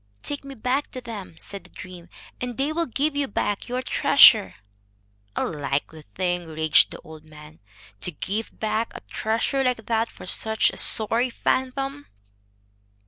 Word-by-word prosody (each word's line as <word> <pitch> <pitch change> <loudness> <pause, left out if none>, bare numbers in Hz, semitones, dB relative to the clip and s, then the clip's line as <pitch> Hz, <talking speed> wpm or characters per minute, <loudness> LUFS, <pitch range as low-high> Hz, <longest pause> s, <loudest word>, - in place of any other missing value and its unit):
"Take 285 -1 -4
me 275 0 -9
back 255 +5 -1
to 255 - -5
them," 215 -8 -8
said 200 -3 -7
the 180 - -16
dream, 180 -2 -11 0.3
"and 245 -2 -4
they 285 +3 0
will 335 +1 0
give 285 +5 -1
you 285 -1 0
back 205 0 -2
your 250 +1 -2
treasure." 255 -7 +6 0.8
"A - - 0
likely 145 +1 -3
thing," 175 -2 -1
raged 155 0 +4
the - - -9
old 155 -1 -12
man, 150 0 -14 0.4
"to 180 - -3
give 200 +8 -4
back 220 +1 -1
a - - -7
treasure 230 +5 -1
like 250 -4 0
that 225 0 0
for - - -12
such 220 +4 +2
a - - -10
sorry 230 +3 +2
phantom." 270 +3 -2
220 Hz, 160 wpm, -24 LUFS, 180-260 Hz, 0.8 s, treasure